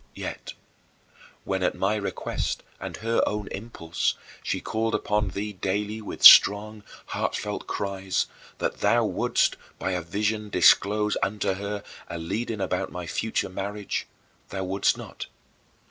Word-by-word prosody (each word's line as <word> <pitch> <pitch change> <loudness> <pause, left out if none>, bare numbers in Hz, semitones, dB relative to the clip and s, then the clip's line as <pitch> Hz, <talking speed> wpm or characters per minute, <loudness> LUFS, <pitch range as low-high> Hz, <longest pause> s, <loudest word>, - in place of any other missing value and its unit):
Yet, - - -6 0.9
when, 95 -1 -2
at 90 - +1
my 100 +3 +1
request 105 -2 -3 0.2
and - - -6
her 115 0 +2
own 105 -1 -2
impulse, 95 -6 -2 0.3
she - - -2
called 115 +1 -1
upon 105 0 0
thee 105 +3 -4
daily 105 +3 -2
with 105 - -7
strong, 105 +1 +9 0.3
heartfelt - - -3
cries, 95 -1 -1 0.3
that - - -2
thou - - +3
wouldst, - - +1 0.2
by 95 - -2
a 90 -1 -1
vision, 105 +5 -2
disclose 105 +3 +4
unto 100 -1 0
her 100 +1 -4 0.2
a - - -5
leading 105 +6 -3
about 95 - -1
my 90 -1 -5
future 110 +7 -1
marriage, 100 +2 -4 0.4
thou 95 -1 -3
wouldst 95 +2 +1
not. - - -8
100 Hz, 135 wpm, -26 LUFS, 95-105 Hz, 0.9 s, strong